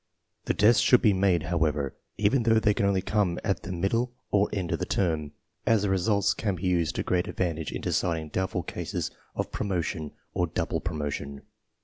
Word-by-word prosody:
The - - 0
tests 110 +2 +5
should 125 - +5
be 105 - +5
made, 95 -4 +2
however, 75 -5 0 0.2
even 110 +5 +3
though 115 -1 +4
they 105 -1 +3
can 100 - +1
only 95 -2 +1
come 100 -4 +1
at 100 -2 0
the 90 - -6
middle 115 +8 0 0.2
or 100 0 +3
end 95 -4 -2
of 85 - 0
the - - -1
term, 80 -6 0 0.4
as 110 -3 +4
the 100 - +1
results 100 +2 +2
can 100 -4 -1
be 90 - -9
used 85 -3 +1
to - - -1
great 90 -1 0
advantage 80 -4 -2
in - - -4
decid 85 -2 +1
ing 80 -1 -7
doubtful 95 +1 -1
cases - - -4 0.2
of - - -2
promotion 85 -5 -2 0.2
or 90 - +1
double 80 - -2
promotion. 75 -3 -4
90 Hz, 200 wpm, -27 LUFS, 80-100 Hz, 0.4 s, tests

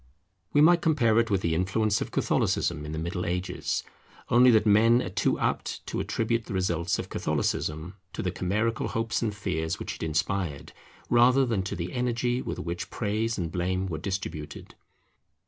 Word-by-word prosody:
We 145 - +4
might 170 +2 +6
compare 120 -9 +3
it 115 0 +1
with 100 -3 +1
the 85 -2 0
influence 100 +4 +1
of - - -3
Catholicism 75 -3 0
in - - -5
the 80 - -4
Middle 85 +3 -3
Ages, 90 +1 -2 0.5
only 125 +1 +6
that 110 -3 +5
men 110 +3 +5
are - - -4
too 100 0 +1
apt - - -2
to - - -3
attribute 115 0 -1
the - - -4
results 85 -2 0
of - - -4
Catholicism 80 +4 -2 0.2
to - - -4
the 90 - -1
chimerical 105 +6 -1
hopes 115 0 -1
and 115 -3 0
fears 90 -6 -2
which - - -5
it - - -15
inspired, 80 -1 -2 0.4
rather 125 +3 +5
than 115 -6 0
to 95 - -4
the 85 +1 -5
energy 125 0 0
with - - -4
which 85 +2 -4
praise 110 +1 -1
and 85 -4 -3
blame 95 +2 -1
were 80 -4 -4
distributed. 95 -5 -5
100 Hz, 180 wpm, -27 LUFS, 85-115 Hz, 0.5 s, might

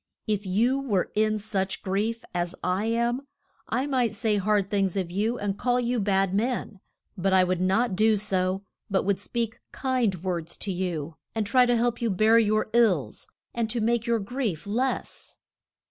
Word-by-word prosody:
If 210 -2 -1
you 235 +8 +2
were 210 -10 0
in 215 0 +2
such 195 -2 -2
grief 215 +4 -1
as 175 0 -2
I 185 +3 0
am, 235 +4 0 0.4
I 250 +4 0
might 255 -6 0
say 215 -1 +1
hard 200 0 +1
things 195 -2 +1
of 180 -3 -2
you 215 +6 0
and 200 -1 -3
call 245 0 +2
you 245 0 0
bad 195 -2 +1
men. 220 -1 -1 0.4
But 190 0 0
I 185 -1 +6
would 180 -1 0
not 195 +3 +2
do 215 +2 +4
so; 190 -2 0 0.3
but 195 -1 +1
would 195 0 +1
speak 235 -1 -3
kind 240 - 0
words 170 -3 -3
to 195 - -4
you, 170 -4 -3 0.2
and 220 -1 0
try 250 +4 +4
to 245 -1 +3
help 240 0 0
you 235 - +1
bear 215 +4 +5
your 215 0 +1
ills, 215 - +2 0.3
and 230 -2 -1
to 235 - -1
make 235 +1 +1
your 235 0 +3
grief 210 - -3
less. 245 +6 -2
210 Hz, 180 wpm, -26 LUFS, 190-235 Hz, 0.4 s, I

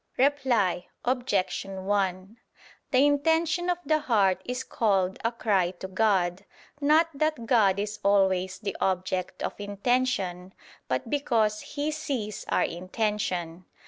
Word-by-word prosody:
Reply 250 -10 +2 0.2
Obj. 245 -7 0
1: 195 +1 -2 0.5
The 260 +2 +4
intention 320 +4 +2
of 355 - +1
the 310 0 +2
heart 205 -10 +2
is 250 +1 -3
called 190 -4 0
a 230 - +1
cry 200 -6 +1
to 190 - -6
God, 190 -2 +1 0.4
not 310 +3 +5
that 305 -4 -1
God 210 -5 +4
is 210 +1 -3
always 190 -2 +2
the 205 -2 -4
object 185 -1 -1
of - - -2
intention, 200 -4 -1 0.3
but 130 - -2
because 225 -7 +1
He 290 +1 -3
sees 240 -9 -4
our - - +2
intention. 185 -2 -2
210 Hz, 125 wpm, -27 LUFS, 190-255 Hz, 0.5 s, not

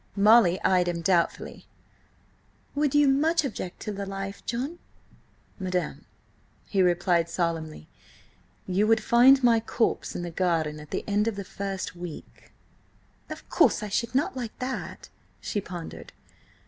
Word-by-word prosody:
Molly 205 -3 +5
eyed 180 -1 +3
him 170 -1 -2
doubtfully. 170 0 0 1.1
"Would 290 -1 0
you 290 -1 +5
much 310 +4 +2
object 190 -8 -5
to 210 - -4
the 200 -1 -5
life, 195 0 -6
John?" 270 +9 -3 0.8
"Madam," 185 -1 -3 0.6
he 195 - 0
replied 175 -1 +2
solemnly, 165 - -3 0.8
"you 195 +3 +1
would 225 -1 +3
find 260 +4 +6
my 235 -2 +5
corpse 230 +1 -1
in 175 - -3
the 175 - -5
garden 165 -4 0
at 150 0 -12
the - - -3
end 210 +1 +1
of 225 - -1
the 200 - -5
first 195 -4 -5
week." 175 - -10 0.8
"Of - - -9
course - - +3
I 210 - -4
should 235 +4 -2
not 275 0 +1
like 240 -4 -6
that," 255 +1 -5 0.3
she 205 - -3
pondered. 175 -3 -9
195 Hz, 145 wpm, -26 LUFS, 175-235 Hz, 1.1 s, find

